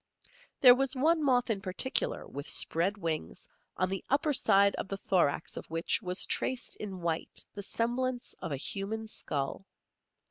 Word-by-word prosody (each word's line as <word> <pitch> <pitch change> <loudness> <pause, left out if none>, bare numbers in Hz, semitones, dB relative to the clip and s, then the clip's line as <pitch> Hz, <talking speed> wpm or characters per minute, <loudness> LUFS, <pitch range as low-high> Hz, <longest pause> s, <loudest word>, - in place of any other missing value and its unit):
There 250 -2 +10
was 270 +1 0
one 315 +4 +2
moth 250 -4 +2
in 200 -3 -1
particular, 195 +8 0
with 140 +1 -7
spread 185 +6 +2
wings, 165 -5 -4 0.3
on 185 - +2
the 195 0 -3
upper 290 +2 +2
side 200 -5 +4
of - - -4
the 195 - -4
thorax 175 -7 0
of - - -7
which 165 +1 0
was 180 0 -1
traced 260 -1 -1
in 195 -4 -6
white 165 -1 -1
the 205 - -6
semblance 245 +4 -2
of - - -4
a 140 - -1
human 210 +9 -4
skull. 145 -1 -4
200 Hz, 165 wpm, -30 LUFS, 180-250 Hz, 0.3 s, There